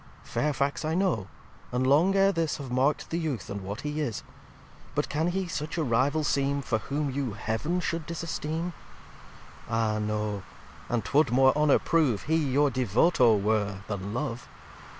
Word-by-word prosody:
Fairfax 140 Hz, -1 st, -1 dB
I 155 Hz, +1 st, 0 dB
know; 175 Hz, -, +1 dB, 0.4 s
and 125 Hz, +1 st, 0 dB
long 160 Hz, +9 st, +4 dB
ere 195 Hz, 0 st, +5 dB
this 165 Hz, -4 st, -1 dB
Have 135 Hz, -4 st, -7 dB
mark'd 135 Hz, +4 st, +1 dB
the 165 Hz, -, 0 dB
Youth, 140 Hz, -, -3 dB
and 100 Hz, 0 st, -4 dB
what 100 Hz, +4 st, -5 dB
he 150 Hz, +1 st, -3 dB
is. 120 Hz, -8 st, -3 dB, 0.7 s
But -, -, 0 dB
can 155 Hz, +3 st, 0 dB
he 185 Hz, +1 st, -1 dB
such 155 Hz, +1 st, -4 dB
a 160 Hz, -, +1 dB
Rival 140 Hz, +5 st, +2 dB
seem 140 Hz, -1 st, 0 dB
For 110 Hz, -3 st, 0 dB
whom 140 Hz, +3 st, -2 dB
you 130 Hz, -4 st, -2 dB
Heav'n 110 Hz, -, -2 dB
should 165 Hz, -2 st, -3 dB
disesteem? 170 Hz, 0 st, -3 dB, 1.0 s
Ah, 110 Hz, -2 st, +1 dB
no! 105 Hz, -1 st, -2 dB, 0.5 s
and 115 Hz, -4 st, -1 dB
'twould 145 Hz, -2 st, +3 dB
more 130 Hz, +3 st, +4 dB
Honour 150 Hz, -1 st, +4 dB
prove 150 Hz, -, +1 dB
He 160 Hz, -, +1 dB
your 145 Hz, -1 st, +2 dB
Devoto 125 Hz, -, +3 dB
were, 105 Hz, -1 st, 0 dB
than 100 Hz, -1 st, -4 dB
Love. 125 Hz, 0 st, -4 dB
140 Hz, 165 wpm, -28 LUFS, 115-155 Hz, 1.0 s, ere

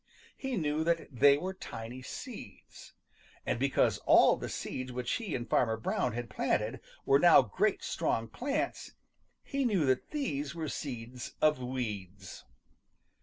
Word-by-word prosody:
He 265 Hz, -3 st, -3 dB
knew 155 Hz, -2 st, 0 dB
that 170 Hz, 0 st, 0 dB
they 140 Hz, +3 st, +6 dB
were 185 Hz, +5 st, -4 dB
tiny 120 Hz, -7 st, -8 dB
seeds. -, -, -10 dB, 0.5 s
And -, -, -1 dB
because 135 Hz, +1 st, +2 dB
all -, -, +7 dB
the -, -, -6 dB
seeds 130 Hz, 0 st, -4 dB
which 125 Hz, 0 st, -3 dB
he 215 Hz, -7 st, -2 dB
and 120 Hz, -1 st, -4 dB
Farmer 110 Hz, -3 st, +2 dB
Brown 110 Hz, -, -1 dB
had 120 Hz, +1 st, -4 dB
planted 110 Hz, +2 st, -1 dB, 0.3 s
were 140 Hz, -, +5 dB
now 175 Hz, +1 st, +7 dB
great 100 Hz, -, 0 dB
strong 115 Hz, 0 st, -1 dB
plants, 275 Hz, -, -3 dB, 0.5 s
he 275 Hz, -1 st, -2 dB
knew 200 Hz, -, +2 dB
that 130 Hz, -1 st, +1 dB
these 160 Hz, -, -3 dB
were 160 Hz, -2 st, -3 dB
seeds 125 Hz, -3 st, -6 dB
of 150 Hz, -3 st, +3 dB
weeds. 105 Hz, -7 st, -5 dB
130 Hz, 145 wpm, -31 LUFS, 120-165 Hz, 0.5 s, all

